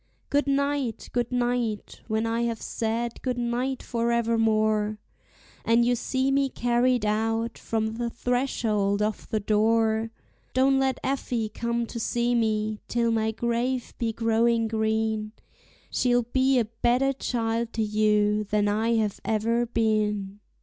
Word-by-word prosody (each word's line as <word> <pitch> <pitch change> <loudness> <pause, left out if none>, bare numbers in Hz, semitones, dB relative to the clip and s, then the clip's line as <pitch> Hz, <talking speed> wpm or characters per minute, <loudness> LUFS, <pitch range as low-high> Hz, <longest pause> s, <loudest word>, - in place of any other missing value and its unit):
Good 285 0 +2
night! 280 -3 -1
good 240 0 -1
night! 240 -3 -1
when 220 0 0
I 230 +1 0
have 230 -2 -1
said 230 +1 -3
good 250 -2 -2
night 245 +2 -2
forevermore, 225 -3 +1 0.7
And 230 +1 +3
you 245 - +3
see 260 +3 0
me 275 0 +2
carried 245 -1 +1
out 225 +2 0
from 220 0 -2
the 240 0 -1
threshold 225 -5 0
of 215 0 -3
the 215 - 0
door, 220 +1 +2 0.5
Don't 270 +1 +4
let 265 -1 +1
Effie 245 -4 -1
come 235 +2 -2
to 235 - -6
see 240 +2 0
me 215 -2 0
till 235 -1 +1
my 220 -1 +1
grave 235 +3 -1
be 230 -1 0
growing 230 0 +2
green, 220 -1 -1 0.6
She'll 245 -1 +2
be 260 +3 +2
a 235 - +2
better 240 +4 +1
child 230 -2 -2
to 225 - 0
you 210 0 +2
than 205 0 +1
ever 210 +1 0
I 230 +1 +2 0.6
have 240 0 0
been. 210 -3 0
230 Hz, 140 wpm, -26 LUFS, 220-245 Hz, 0.7 s, Don't